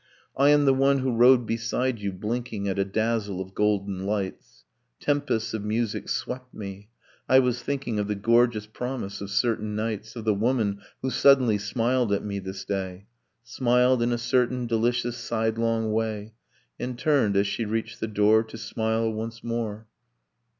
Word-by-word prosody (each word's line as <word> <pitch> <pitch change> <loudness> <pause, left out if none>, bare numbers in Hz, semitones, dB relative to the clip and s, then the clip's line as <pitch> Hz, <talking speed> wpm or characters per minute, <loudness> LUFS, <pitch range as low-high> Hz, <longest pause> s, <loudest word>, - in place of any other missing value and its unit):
'I 140 +1 +4
am 145 0 +5
the 135 - +5
one 135 +1 +3
who 130 -2 -1
rode 120 +1 +6
beside 115 +2 -1
you, 100 -1 -2
blinking 105 +1 -3
At 100 0 -1
a - - +4
dazzle 105 -1 -1
of 95 0 -6
golden 100 -2 0
lights. 100 -2 -4 0.3
Tempests 145 -7 0
of 110 -2 -3
music 110 +1 -2
swept 125 0 -4
me: 100 0 -8 0.4
I 130 - +7
was 125 -2 +2
thinking 130 -5 -2
Of 105 - -1
the 105 - -1
gorgeous 115 +1 +2
promise 110 -3 -5
of 100 - -5
certain 105 0 0
nights: 110 +1 -3
Of 115 -2 -6
the 110 - +3
woman 105 -2 0 0.2
who 130 - 0
suddenly 125 -5 +5
smiled 120 +2 0
at 100 - -1
me 100 -1 -3
this 95 0 -7
day, 95 -1 -4 0.4
Smiled 125 0 +2
in 120 +1 +1
a 120 - +1
certain 125 +1 +1
delicious 120 +1 0
sidelong 115 -1 0
way, 110 -1 -2 0.5
And 125 -1 -4
turned, 130 -9 +2
as 100 - +3
she 100 +3 -2
reached 110 +1 -3
the 110 - -2
door, 110 +1 +4
To 110 0 -9
smile 110 0 -1
once 115 +1 -6
more 115 -2 -3
115 Hz, 170 wpm, -26 LUFS, 105-125 Hz, 0.5 s, I